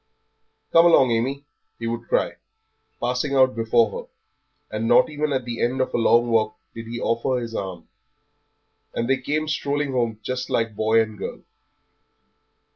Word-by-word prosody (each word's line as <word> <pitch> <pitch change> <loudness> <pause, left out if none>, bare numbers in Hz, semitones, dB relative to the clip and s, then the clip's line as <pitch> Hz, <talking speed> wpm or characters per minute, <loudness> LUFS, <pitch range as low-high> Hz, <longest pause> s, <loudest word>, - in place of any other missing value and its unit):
"Come 165 +1 +7
along, 135 -7 +5
Amy," 135 +5 -1 0.3
he 115 - -6
would 115 +1 -4
cry, - - 0 0.6
passing 125 +3 -1
out 130 -1 +4
before 115 -1 +2
her; - - -7 0.7
and 110 +1 -1
not 125 +6 +5
even 150 0 -2
at 130 -3 -1
the 120 -1 -5
end 125 +2 0
of 130 - -1
a - - +1
long 120 +1 +4
walk 110 -1 +1 0.2
did 115 0 -8
he 120 +1 -5
offer 115 +3 0
her - - 0
his 115 -1 -6
arm; 95 -5 -5 1.1
and 115 - -1
they 135 +1 +2
came 150 +4 -2
strolling 145 -1 -1
home 120 -4 -1
just 130 +2 -3
like 115 -2 0
boy 110 +1 +3
and 110 -2 -10
girl. - - -6
120 Hz, 170 wpm, -23 LUFS, 115-135 Hz, 1.1 s, Come